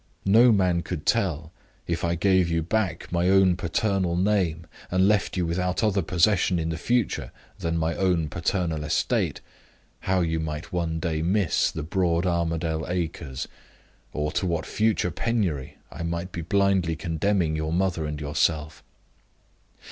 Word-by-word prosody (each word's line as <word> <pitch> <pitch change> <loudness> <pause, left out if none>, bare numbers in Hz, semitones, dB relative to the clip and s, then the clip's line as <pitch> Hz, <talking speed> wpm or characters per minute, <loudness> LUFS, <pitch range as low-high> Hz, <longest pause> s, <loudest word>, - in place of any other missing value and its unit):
No 115 +5 +6
man 90 -4 +2
could 85 -3 -5
tell 85 -9 0 0.3
if 85 -1 -2
I 85 0 +1
gave 95 0 +3
you 80 -1 0
back 90 -2 -2
my 85 +1 +2
own 95 -2 +5
paternal 90 0 0
name, 90 -4 +1 0.2
and 95 +1 +3
left 105 -2 +1
you 90 - +1
without 90 +4 -1
other 100 -2 +2
provision 90 +2 +2
in 80 -1 -1
the 80 - -3
future 120 +2 0 0.3
than 85 -2 -1
my 80 0 0
own 90 -4 +1
paternal 80 0 -1
estate 75 - 0 0.6
how 95 0 +1
you 80 -1 0
might 75 +1 -5
one 85 -2 -1
day 80 -1 -1
miss 95 +1 +2
the 80 - -5
broad 85 +1 0
Armadale 85 -2 -1
acres, 80 -6 -3 0.6
or 75 0 -2
to 95 - -1
what 85 -2 -1
future 110 -5 +1
penury 90 - -2
I - - -8
might 85 +2 -3
be 85 - -5
blindly 95 -1 +1
condemning 80 +1 0
your 80 0 -2
mother 85 -3 0
and 75 0 -4
yourself. 75 +1 -1
85 Hz, 155 wpm, -25 LUFS, 80-95 Hz, 0.6 s, No